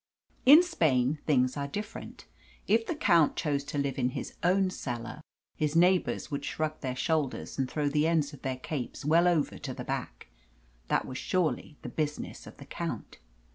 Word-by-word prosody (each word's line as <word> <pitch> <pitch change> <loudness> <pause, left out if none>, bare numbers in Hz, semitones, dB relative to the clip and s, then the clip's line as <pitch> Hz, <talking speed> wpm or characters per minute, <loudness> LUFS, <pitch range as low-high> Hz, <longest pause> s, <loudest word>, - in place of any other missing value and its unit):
In 305 +6 +10
Spain 145 - +1
things 130 -4 +3
are 140 -1 -2
different. 210 +9 -7 0.4
If 225 +2 +3
the 340 - -1
count 170 - +4
chose 145 -3 -1
to 145 - -5
live 140 -1 -1
in 125 0 +2
his - - -5
own 185 +1 +3
cellar, 120 -2 -5 0.4
his 150 0 0
neighbours 180 0 +3
would 140 - -3
shrug 155 0 -3
their 130 -1 -3
shoulders 145 0 -1
and 130 -1 0
throw 150 -2 -1
the 150 +2 +2
end 155 -3 +1
of 145 - -11
their 130 -1 -2
capes 130 0 -5
well 165 +3 +5
over 165 -5 +1
to - - -5
the - - -5
back. - - -5 0.6
That - - +1
was 130 - -6
surely 160 -4 -1
the - - -5
business 150 -1 -4
of - - -12
the - - -11
count. - - -5
150 Hz, 180 wpm, -29 LUFS, 135-170 Hz, 0.6 s, In